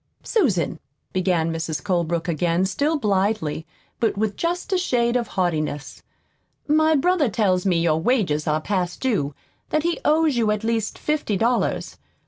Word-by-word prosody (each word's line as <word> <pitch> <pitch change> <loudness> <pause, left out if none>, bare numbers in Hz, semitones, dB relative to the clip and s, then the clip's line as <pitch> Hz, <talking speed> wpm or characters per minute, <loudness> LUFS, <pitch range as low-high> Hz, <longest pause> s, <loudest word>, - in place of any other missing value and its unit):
"Susan," 190 - +1 0.3
began 175 -3 +1
Mrs. 160 -2 -3
Colebrook 170 -3 0
again, 170 +2 +1
still 290 +11 0
blithely, 195 - 0 0.3
but 225 -3 +1
with 210 -1 0
just 350 - -2
a - - +3
shade 240 -8 +1
of 240 -2 0
haughtiness, 155 -6 -2 0.7
"my 315 +1 +4
brother 310 -1 +2
tells 190 -3 +1
me 175 -3 +3
your 160 -1 +1
wages 175 - +1
are 155 0 +1
past 180 0 -2
due; 185 - -1 0.3
that 305 - +1
he 340 0 0
owes 305 -3 +3
you 225 -2 +2
at 210 0 0
least 225 -1 -1
fifty 300 -9 -1
dollars. 235 +4 0
205 Hz, 150 wpm, -23 LUFS, 170-260 Hz, 0.7 s, my